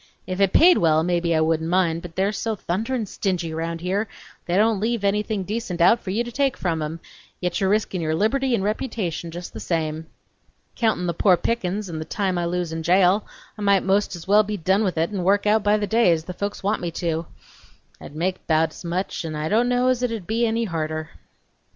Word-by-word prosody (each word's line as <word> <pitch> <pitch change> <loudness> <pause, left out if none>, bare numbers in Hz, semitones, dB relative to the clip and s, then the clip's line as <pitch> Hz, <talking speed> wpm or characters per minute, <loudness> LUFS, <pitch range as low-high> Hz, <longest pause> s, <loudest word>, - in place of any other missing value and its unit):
If 185 +1 -3
it 195 -1 +4
paid 355 +2 +6
well, 160 -1 +3
mebbe 175 0 0
I 165 -1 +2
wouldn't 160 0 +1
mind, 170 -2 +1
but 170 -2 -10
they're 195 +2 +1
so 220 +1 -2
thunderin' 220 +6 -2
stingy 180 -4 -2
round 165 +1 -3
here, 195 +5 -1 0.4
they 175 +1 +1
don't 215 0 +3
leave 225 0 -1
anything 205 0 0
decent 200 -3 -4
out 180 +7 +5
for 195 - -8
you 215 +5 0
to 240 - -7
take 275 +1 0
from 165 -4 -1
em, 155 +2 -4 0.4
yet 180 +1 -2
you're 190 - +2
reskin' 205 -3 0
your 155 -1 0
liberty 255 +7 +1
n' 195 - -2
reputation 205 -6 -2
jest 175 +2 -8
the - - -7
same!... 160 -1 -2 0.7
Countin' 220 -6 +1
the 170 - 0
poor 180 +2 +4
pickin's 210 -2 -2
n' 165 -3 -5
the 155 - -5
time 185 0 -1
I 170 - -1
lose 175 -1 -2
in 160 - -3
jail 185 +4 +3 0.3
I - - -10
might 200 -2 +3
most's 190 -3 0
well 205 +2 +6
be 210 0 -3
done 190 +4 +2
with 185 -5 -1
it 165 +4 +1
n' 195 - -2
work 200 +3 +2
out 215 +1 +4
by 205 +1 +3
the 210 - -1
day, 225 -3 +3
as 160 -1 +1
the 180 - -7
folks 200 +3 -4
want 205 +2 0
me 175 - -2
to; 165 -1 -2 0.7
I'd 145 - -11
make 180 +4 -2
bout's 160 +1 +1
much 180 +2 -3
n' 160 -1 -5
I 150 +1 -2
don't 235 +3 +2
know's 250 0 +2
it 250 - +1
would 225 -5 -5
be 230 +4 +1
any 225 +1 0
harder!" 155 -4 -3
185 Hz, 225 wpm, -23 LUFS, 170-215 Hz, 0.7 s, paid